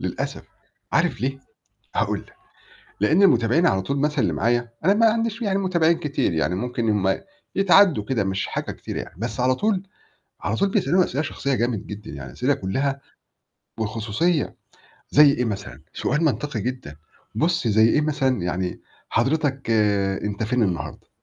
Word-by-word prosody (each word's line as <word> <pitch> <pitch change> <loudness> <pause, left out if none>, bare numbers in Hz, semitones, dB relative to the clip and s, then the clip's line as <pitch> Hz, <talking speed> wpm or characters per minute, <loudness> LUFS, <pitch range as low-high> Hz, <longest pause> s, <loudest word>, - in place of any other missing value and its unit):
للأسف - - -4 0.5
عارف - - +1
ليه؟ 135 +2 -2 0.6
هاقول - - 0
لك، - - -16 0.7
لإن 155 - +4
المتابعين 140 - +4
على 95 - +2
طول 140 +8 -2
مثلًا 150 +1 0
اللي 110 - +1
معايا، 120 +3 +1 0.2
أنا 195 +4 +5
ما 225 +2 +4
عنديش 225 +1 0
يعني 195 -3 +1
متابعين 170 -4 +2
كتير 140 - -1
يعني 80 +2 0
ممكن 120 +3 -2
هُم 95 -2 +1 0.3
يتعدوا 195 - +5
كده 110 -2 0
مش 95 0 -1
حاجة - - -4
كتيرة - - -6
يعني، - - -7
بس 115 +4 -4
على 130 +1 +3
طول 200 +5 0 0.6
على - - -1
طول 200 - +1
بيسألوني 185 -2 +2
أسئلة 140 - -2
شخصية 140 -2 -2
جامد 115 -4 -1
جدًا، 105 +1 -8
يعني - - -8
أسئلة 130 +3 +1
كلّها 135 +7 -2 0.8
والخصوصية 115 - -1 0.5
زي 150 0 +7
إيه 125 -2 -1
مثلًا، 100 - -5
سؤال 150 +3 0
منطقي 145 -5 -1
جدًا 120 - -5 0.4
بُصّ 165 -6 +1
زي 110 +1 +5
إيه 150 - +3
مثلًا، 135 - 0
يعني 90 +1 -2 0.3
حضرتك 135 +1 0 0.5
أنت 105 +1 -3
فين 120 +2 +1
النهارده؟ 90 -6 -3
130 Hz, 160 wpm, -23 LUFS, 110-160 Hz, 0.8 s, زي